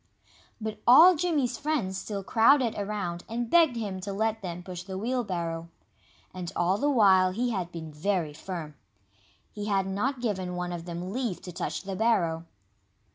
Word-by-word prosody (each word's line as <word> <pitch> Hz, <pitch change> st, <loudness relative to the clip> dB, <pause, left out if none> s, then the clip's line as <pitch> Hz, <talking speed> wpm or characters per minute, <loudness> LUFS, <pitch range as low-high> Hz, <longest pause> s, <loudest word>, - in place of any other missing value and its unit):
But 215 Hz, -1 st, -5 dB
all 330 Hz, +9 st, +9 dB
Jimmy's 295 Hz, -7 st, 0 dB
friends 285 Hz, -11 st, -1 dB
still 200 Hz, 0 st, -4 dB
crowded 235 Hz, +4 st, +4 dB
around 200 Hz, -4 st, -3 dB
and 235 Hz, +1 st, -3 dB
begged 325 Hz, -7 st, +5 dB
him 205 Hz, -5 st, -4 dB
to 195 Hz, +2 st, -5 dB
let 220 Hz, +2 st, -1 dB
them 180 Hz, -2 st, -6 dB
push 180 Hz, -1 st, -7 dB
the 190 Hz, +1 st, -6 dB
wheelbarrow. 180 Hz, -8 st, -2 dB, 0.6 s
And 180 Hz, -2 st, -5 dB
all 180 Hz, +3 st, +1 dB
the 290 Hz, -, +2 dB
while 195 Hz, -8 st, +5 dB
he 240 Hz, +4 st, 0 dB
had 180 Hz, -5 st, -3 dB
been 160 Hz, -2 st, -7 dB
very 165 Hz, -1 st, -1 dB
firm. 165 Hz, -1 st, -6 dB, 0.8 s
He 205 Hz, 0 st, -5 dB
had 195 Hz, -2 st, +1 dB
not 210 Hz, +8 st, -1 dB
given 190 Hz, -6 st, -2 dB
one 180 Hz, 0 st, -3 dB
of 170 Hz, -1 st, -6 dB
them 175 Hz, +2 st, -5 dB
leave 240 Hz, -7 st, -2 dB
to 185 Hz, -, -7 dB
touch 175 Hz, -, -4 dB
the 195 Hz, -1 st, -5 dB
barrow. 175 Hz, -7 st, +1 dB
195 Hz, 170 wpm, -28 LUFS, 180-230 Hz, 0.8 s, all